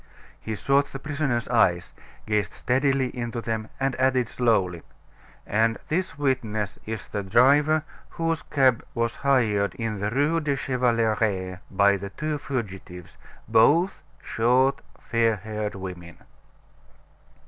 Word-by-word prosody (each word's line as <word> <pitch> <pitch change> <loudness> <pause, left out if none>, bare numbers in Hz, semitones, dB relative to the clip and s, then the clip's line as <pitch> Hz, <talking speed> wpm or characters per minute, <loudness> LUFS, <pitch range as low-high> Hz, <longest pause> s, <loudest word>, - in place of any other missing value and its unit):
He 110 - -4
sought 140 +6 +2
the - - -5
prisoner's 140 -4 -2
eyes, 90 -8 +2 0.3
gazed 105 -1 0
steadily 135 0 0
into 120 -1 -4
them, 110 -1 -3
and 135 -1 0
added 130 -3 +2
slowly: 95 -8 +1 0.6
"And 115 +2 +1
this 180 0 -1
witness 110 -8 -1
is 110 0 -5
the 105 - -3
driver 140 +9 +4 0.3
whose 165 -1 -2
cab 130 -5 +2
was 115 0 -1
hired 115 -8 +1
in 115 -3 -3
the 105 +1 -1
Rue 145 +7 +1
de 150 -3 -1
Chevaleret 110 -8 0
by 100 +1 +3
the 100 +1 -6
two 150 +7 -3
fugitives, 95 -9 -6 0.3
both 145 - +4 0.2
short, 125 +4 +2 0.2
fair 115 -1 +1
haired 105 +1 -5
women." 90 -3 -8
115 Hz, 125 wpm, -25 LUFS, 105-135 Hz, 0.6 s, driver